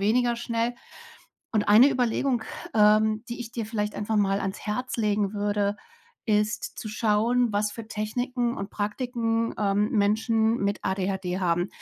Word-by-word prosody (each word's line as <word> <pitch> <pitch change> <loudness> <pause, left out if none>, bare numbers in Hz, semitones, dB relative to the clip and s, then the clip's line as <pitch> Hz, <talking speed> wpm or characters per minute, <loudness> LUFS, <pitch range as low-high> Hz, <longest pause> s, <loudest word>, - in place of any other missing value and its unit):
weniger 235 +4 +2
schnell. 235 0 -1 0.8
Und 215 -3 0
eine 230 +7 +8
Überlegung, 245 -1 0 0.3
ähm, 215 +1 +4
die 235 - -5
ich 230 - -8
dir 230 -3 -4
vielleicht 210 -1 -2
einfach 210 +1 -2
mal 195 -1 +2
ans 195 +1 -3
Herz 230 +5 -3
legen 210 -2 0
würde, 205 0 0 0.5
ist 210 -1 0
zu 215 - -6
schauen, 225 +3 +2
was 205 0 +1
für 230 -2 -8
Techniken 240 +3 -2
und 195 +1 -5
Praktiken, 230 +1 -1
ähm, 205 +1 +1
Menschen 220 +2 +2
mit 200 0 -1
ADHD 190 -1 -2
haben. 175 +1 +1
215 Hz, 145 wpm, -26 LUFS, 205-235 Hz, 0.8 s, eine